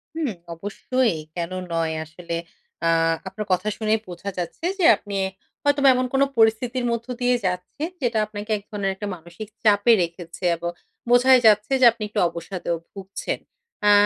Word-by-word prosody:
হুম 320 -4 -1 0.2
অবশ্যই, 205 +6 -1 0.2
কেন 170 0 -3 0.2
নয়? 165 -1 0
আসলে 170 +2 -6 0.5
আ - - +4 0.4
আপনার 210 +2 -5
কথা 185 +3 +1
শুনেই 220 0 +1
বোঝা 180 +2 -6
যাচ্ছে 180 - -4
যে 350 - +3
আপনি 200 -1 -5 0.5
হয়তোবা 285 -1 +4
এমন 255 0 +1
কোনো 270 +1 +4
পরিস্থিতির 235 +3 +2
মধ্য 235 0 -3
দিয়ে 245 0 +3
যাচ্ছেন 180 - -2
যেটা 235 -3 +1
আপনাকে 210 +1 -7
এক 205 - -12
ধরনের 200 -3 -1
একটা 205 +2 -5
মানসিক 170 +5 -10 0.2
চাপে 210 +2 +5
রেখেছে 170 +1 -5
এবং 170 +1 -4 0.4
বোঝাই 250 +1 +7
যাচ্ছে 210 +3 +4
যে 250 - +8
আপনি 230 -1 -7
একটু 210 - -2
অবসাদেও 170 0 -4 0.2
ভুগছেন। 195 0 -5 0.5
আ - - +8
210 Hz, 160 wpm, -23 LUFS, 180-240 Hz, 0.5 s, যে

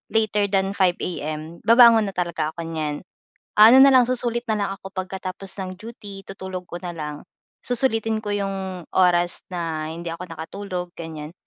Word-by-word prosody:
later 210 -2 +2
than 195 0 +1
5 185 -3 +3
AM 155 0 -5
babangon 230 -2 +7
na 195 - -6
talaga 170 -3 -1
ako 170 - -5
niyan. 155 -1 -3 0.5
Ano 225 +5 +9
na 275 - +9
lang, 250 -2 +6
susulit 240 -1 -1
na - - +3
lang 200 -1 -1
ako 195 0 -11
pagkatapos 190 0 -5
ng 185 - -4
duty, 205 -2 -10
tutulog 190 -2 -7
ko 175 - -5
na 175 - -4
lang. 150 -2 -6 0.4
Susulitin 225 -3 0
ko 205 - -5
'yong 195 -3 -3
oras 175 -1 +3
na 165 -3 -3
hindi 170 +1 -6
ako 170 +2 -7
nakatulog 180 +1 -5
ganiyan, 160 -1 -7
190 Hz, 165 wpm, -23 LUFS, 170-210 Hz, 0.5 s, Ano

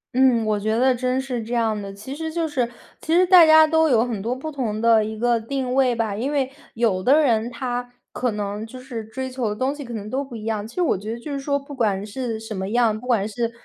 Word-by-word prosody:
嗯， 255 -3 +4
我 215 -1 +1
觉 220 +2 0
得 255 +1 +4
真 255 +1 -1
是 255 -3 -3
这 240 +2 -4
样 220 -2 +1
的， 195 0 -7
其 210 +8 -8
实 320 +1 -4
就 330 -1 -1
是 255 -6 -1 0.3
其 320 - -1
实 365 +1 +5
大 355 -3 +8
家 315 0 +8
都 320 0 +3
有 240 -2 +4
很 225 -5 -4
多 235 +5 -2
不 310 +4 -6
同 230 -7 -3
的 225 -1 +4
一 220 0 -5
个 235 0 +2
定 255 +2 -3
位 260 -2 +3
吧。 220 -3 -1
因 255 +7 -2
为 270 -2 0 0.2
有 220 -5 +1
的 275 +10 +5
人 235 -5 +2
他， 245 0 -4 0.2
可 250 - -1
能 205 0 -4
就 225 +3 -9
是 250 -3 -6
追 260 +5 -5
求 255 -4 -2
的 210 - -3
东 260 +5 0
西 290 -1 -8
可 240 - -9
能 210 -1 -6
都 275 +2 -1
不 260 -4 -10
一 215 - -7
样， 215 -1 -2
其 225 - -15
实 360 - +1
我 320 - +2
觉 210 +3 -6
得 235 - -5
就 290 +4 -7
是 275 - -2
说 280 +1 0
不 280 +1 -9
管 205 -6 0
是 225 +1 -4
什 220 -1 -7
么 190 +1 -3
样， 225 -2 +2
不 250 - -11
管 215 -5 +2
是 230 +1 -2
240 Hz, 295 characters per minute, -22 LUFS, 220-265 Hz, 0.3 s, 大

